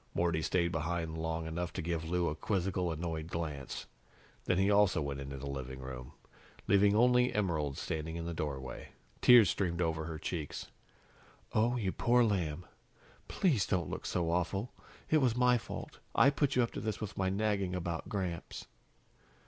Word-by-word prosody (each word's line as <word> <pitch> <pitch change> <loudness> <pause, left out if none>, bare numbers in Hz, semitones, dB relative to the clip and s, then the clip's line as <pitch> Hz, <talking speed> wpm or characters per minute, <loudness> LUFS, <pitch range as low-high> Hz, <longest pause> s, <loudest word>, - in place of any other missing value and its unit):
Morty 85 -2 +1
stayed 85 +1 +1
behind 80 0 -2
long 80 0 -2
enough 85 +2 -3
to - - -3
give 80 -1 -2
Lou 90 0 +1
a - - 0
quizzical, 90 +1 -1
annoyed 80 -1 -3
glance. 80 -5 -4 0.6
Then 90 - +2
he 95 +2 +3
also 100 -4 +4
went 70 -2 -3
into 70 0 -6
the 70 - -7
living 65 -2 -5
room, 65 -1 -8 0.5
leaving 100 +1 +5
only 125 +2 +5
Emerald 80 - -1
standing 80 +1 -3
in 85 0 -4
the 85 - -3
doorway. 70 -5 -5 0.3
Tears 120 -7 +8
streamed 85 -3 -1
over 80 -2 0
her 80 -1 -5
cheeks. 80 -2 -5 0.8
"Oh, 120 +3 +2
you 100 -5 0
poor 120 +4 +3
lamb 90 -6 0 0.6
please 140 - +2
don't 90 -5 0
look - - -4
so 85 -2 0
awful! 95 +6 -1 0.4
It 155 - +6
was 130 -6 +2
my 125 -1 +4
fault. - - -8 0.2
I 140 - +6
put 140 -1 +1
you 125 - +4
up 115 - -2
to - - -5
this 110 -1 -2
with 110 -3 -5
my 95 -1 0
nagging 100 -2 0
about 85 -2 -3
Gramps." 90 -4 -4
85 Hz, 175 wpm, -33 LUFS, 80-105 Hz, 0.8 s, Tears